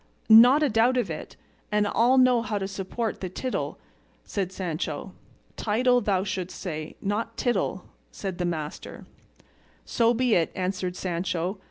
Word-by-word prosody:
"Not 245 +7 +8
a 295 - +3
doubt 230 +4 +3
of 205 -9 0
it; 155 - -7 0.4
and 210 0 +2
I'll 240 +5 +3
know 255 -2 +5
how 215 -2 -2
to 195 -1 -2
support 195 +4 -4
the 185 - -3
tittle," 255 +8 -3 0.5
said 190 -3 -3
Sancho. 180 -3 -4 0.4
"Title 245 +3 +2
thou 195 -3 +1
shouldst 185 -2 -4
say, 155 -4 -5
not 220 +3 -2
tittle," 195 -6 -1 0.3
said 190 -3 -6
his 175 - 0
master. 155 -3 -5 0.8
"So 235 0 +2
be 250 -1 +2
it," 170 -4 +2
answered 185 -1 -2
Sancho. 180 +1 -2
200 Hz, 150 wpm, -26 LUFS, 185-235 Hz, 0.8 s, Not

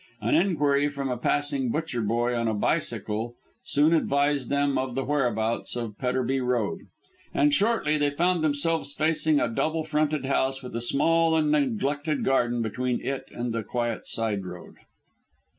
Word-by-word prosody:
An 110 +1 0
inquiry 145 -5 +2
from 140 -2 -3
a - - 0
passing 135 +1 0
butcher 150 -3 -2
boy 120 +3 0
on 115 -1 0
a 110 - 0
bicycle 115 -3 -1 0.3
soon 150 +3 +3
advised 140 -4 +1
them 140 0 +1
of 130 -2 -2
the 135 - 0
whereabouts 120 -6 0
of 115 -4 -4
Petterby 130 +1 0
Road, 125 -4 0 0.6
and 145 +1 +3
shortly 195 -6 +2
they 145 0 +2
found 170 +3 +1
themselves 155 0 0
facing 155 -1 +2
a - - +1
double 155 +7 -1
fronted 155 -2 0
house 135 0 0
with 125 - -7
a 115 - -2
small 165 +6 +2
and 155 -2 +2
neglected 145 +2 0
garden 120 -3 +2
between 125 +3 -1
it 135 0 -4
and 120 -1 -4
the 115 - -1
quiet 120 +1 -3
side 110 -4 -2
road. 90 -1 -10
135 Hz, 160 wpm, -26 LUFS, 120-150 Hz, 0.6 s, soon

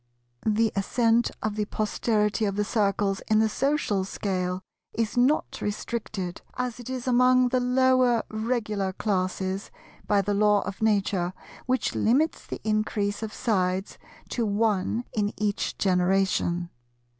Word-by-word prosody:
The 220 +1 +3
ascent 230 +3 +2
of 215 -1 -1
the 210 -1 -1
posterity 215 0 0
of 200 -1 -1
the 210 - +1
Circles 200 -2 0
in 215 - +3
the 220 0 +4
social 245 -4 0
scale 185 -1 -2 0.3
is 225 -1 -1
not 255 +5 +2
restricted, 205 -3 -4 0.2
as 250 -2 -3
it 245 - -8
is 255 -2 -4
among 250 0 +4
the 255 - +2
lower 250 -1 +3
Regular 215 -4 -1
classes, 190 -1 -2 0.4
by 200 -1 +3
the 205 - 0
Law 210 0 +4
of 200 +1 -6
Nature 195 -4 +1 0.3
which 255 0 0
limits 280 +9 +1
the - - -5
increase 215 -1 0
of 220 -1 -4
sides 190 -5 -1 0.3
to 240 - -1
one 215 +1 +1
in 205 -1 0
each 210 -1 -1
generation. 180 -2 +1
210 Hz, 135 wpm, -26 LUFS, 195-235 Hz, 0.4 s, the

